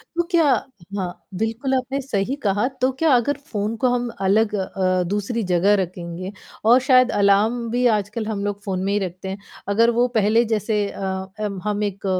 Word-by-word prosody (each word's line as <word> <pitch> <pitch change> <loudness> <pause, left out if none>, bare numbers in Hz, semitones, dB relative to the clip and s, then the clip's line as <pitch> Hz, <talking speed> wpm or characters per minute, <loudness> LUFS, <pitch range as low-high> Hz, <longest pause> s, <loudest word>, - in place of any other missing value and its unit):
तो 345 - +2
क्या 340 -2 +4 0.5
हाँ, 180 -2 -5
बिल्कुल 225 +6 -1
आपने 260 +2 -1
सही 250 -1 -1
कहा। 205 +4 +2
तो 255 +1 +3
क्या 325 - +3
अगर 245 +4 +1
फ़ोन 210 +1 -1
को 250 +3 +2
हम 245 -1 -1
अलग 210 +3 +2
अ, 185 -2 0
दूसरी 205 +4 -2
जगह 180 +4 +4
रखेंगे 180 +1 -6 0.3
और 240 +3 +7
शायद 255 -1 +5
अलार्म 210 +4 +2
भी 245 +1 +1
आजकल 210 +2 -4
हम 210 -2 -3
लोग 205 0 -3
फ़ोन 190 -2 -2
में 195 - 0
ही 205 - +2
रखते 185 0 -5
हैं। 190 - -4 0.3
अगर 225 +4 +4
वो 245 - +4
पहले 220 +3 +3
जैसे 210 -1 0
अ, - - -10 0.4
अम, 205 -3 -3
हम 210 0 -1
एक 200 -1 -4
210 Hz, 185 wpm, -22 LUFS, 195-240 Hz, 0.5 s, और